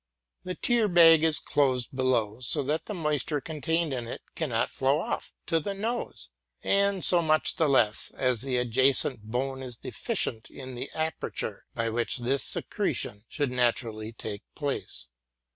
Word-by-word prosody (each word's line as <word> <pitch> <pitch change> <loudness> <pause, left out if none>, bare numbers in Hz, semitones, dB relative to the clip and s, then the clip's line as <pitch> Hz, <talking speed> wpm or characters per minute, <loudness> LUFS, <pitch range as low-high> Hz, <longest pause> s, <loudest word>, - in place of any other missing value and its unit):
The 180 0 -4
tear 235 -3 +2
bag 165 -3 +7
is 160 -2 +3
closed 130 -3 0
below, 120 -4 +1
so 135 +4 0
that 150 +4 -2
the 210 - -4
moisture 150 -2 0
contained 160 +1 -1
in 120 -2 -4
it - - -6
cannot 125 -8 -1
flow 135 +3 +2
off - - -3
to 165 -1 +2
the 195 +6 -4
nose, 215 - -4 0.3
and 200 -1 +2
so 175 -1 +7
much 155 -1 +1
the 160 -4 +3
less 110 -6 +3
as 125 -3 +1
the 130 -1 -1
adjacent 125 +1 +2
bone 130 +5 -3
is 125 -3 -7
deficient 110 0 -3
in 130 -1 -9
the 120 - -5
aperture 160 0 -3
by 115 0 0
which 120 +3 0
this 125 +2 0
secretion 105 +2 -2
should. 145 -5 -2
naturally 115 -3 0
take 110 -3 -6
place. 135 - -3
135 Hz, 160 wpm, -28 LUFS, 120-160 Hz, 0.3 s, bag